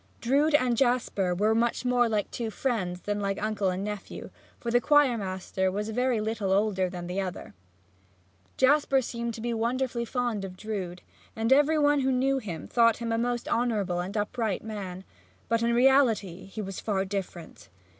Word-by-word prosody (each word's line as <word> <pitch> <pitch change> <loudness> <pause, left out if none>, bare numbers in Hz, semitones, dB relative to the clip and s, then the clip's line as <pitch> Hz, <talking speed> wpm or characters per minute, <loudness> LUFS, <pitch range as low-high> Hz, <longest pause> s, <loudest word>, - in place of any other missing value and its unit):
Drood 285 +5 +2
and 255 -4 +3
Jasper 230 -7 +1
were 210 +4 +2
much 235 +2 0
more 245 -1 +3
like 210 -2 -1
two 230 -2 -3
friends 200 -7 -2
than 205 0 -2
like 195 -1 -2
uncle 210 -2 0
and 185 +1 -2
nephew, 210 -1 -6 0.3
for 235 - -3
the 245 +1 +4
choir 290 -4 +4
master 190 -2 -2
was 210 +3 -3
very 245 +1 +1
little 215 -2 -2
older 195 -2 +2
than 175 -1 -6
the 180 +3 -2
other. 180 - -6 1.0
Jasper 270 0 +3
seemed 235 -1 -4
to 225 - -8
be 235 +1 -2
wonderfully 235 +1 -1
fond 240 -4 -2
of 185 -1 -7
Drood, 185 -5 -5 0.3
and 225 +3 +3
every 295 +3 +4
one 290 -1 +3
who 265 0 +1
knew 265 +1 +2
him 175 - -6
thought 230 -1 +4
him 230 -1 -3
a 225 - +1
most 240 0 -1
honorable 210 -7 0
and 190 +4 -4
upright 210 0 -1
man; 195 -4 -6 0.4
but 230 0 +1
in 235 0 +2
reality 235 -8 +3
he 210 +2 -6
was 195 -1 -6
far 195 -3 -1
different. 190 - -6
220 Hz, 180 wpm, -27 LUFS, 195-245 Hz, 1.0 s, the